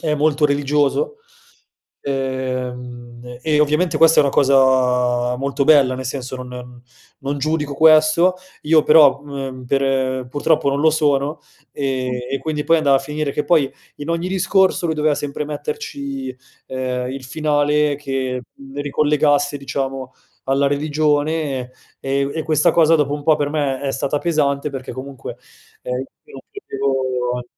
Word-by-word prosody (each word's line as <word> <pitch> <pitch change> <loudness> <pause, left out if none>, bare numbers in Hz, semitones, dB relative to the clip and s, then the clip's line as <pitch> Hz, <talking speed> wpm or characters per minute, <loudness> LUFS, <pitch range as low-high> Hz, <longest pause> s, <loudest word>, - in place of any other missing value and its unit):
è 155 -2 0
molto 150 0 +1
religioso, 145 - +1 0.8
ehm, 130 -2 -3 0.4
e 150 -2 +2
ovviamente 150 +4 +1
questa 165 0 +6
è - - +5
una 140 - +1
cosa 125 -2 +3
molto 140 +1 -2
bella, 140 -4 +5
nel 130 0 -6
senso 130 0 -5
non 125 0 -7
mhmm, 125 0 -10 0.4
non 140 +1 -2
giudico 150 -1 -1
questo, 155 +4 +5 0.3
io 155 0 +4
però, 150 -3 +6
mhmm, 135 -3 -7
per 135 +1 +1
e 130 -1 0
purtroppo 145 +1 +1
non 140 +1 -1
lo 160 - +5
sono, 150 -1 0 0.3
ehm, 130 -2 -2 0.2
e 135 - -1
quindi 150 -2 -3
poi 165 0 +4
andava 140 -3 +3
a - - -1
finire 150 +1 -3
che 150 - -2
poi 150 -6 +2 0.3
in 145 +2 -8
ogni 170 +2 -1
discorso 190 -1 +2
lui 160 - -1
doveva 150 -1 +1
sempre 145 +1 -4
metterci, 280 - -5 0.3
ehm, 130 -1 -3
il 135 -1 -7
finale 150 0 +1
che, 135 -3 -3
mhmm, 135 +1 -9
ricollegasse, 145 0 +1
diciamo, 135 -1 -4 0.3
alla 135 +1 +1
religione, 150 0 0 0.4
e 135 +1 -1
e - - +1
u 140 - -4
e 160 - -2
questa 155 -2 +3
cosa 165 -1 +4
dopo 145 -1 0
un 145 - -6
po' 155 -2 +4
per 145 -1 -1
me 145 -3 -1
è 135 -1 -2
stata 145 +1 -2
pesante 150 -3 0
perché 130 -2 -6
comunque, 130 +1 -8 0.5
ehm, 125 0 -3 0.2
io 450 - -19
non - - -9
credevo 130 - -2
140 Hz, 160 wpm, -19 LUFS, 130-155 Hz, 0.8 s, questa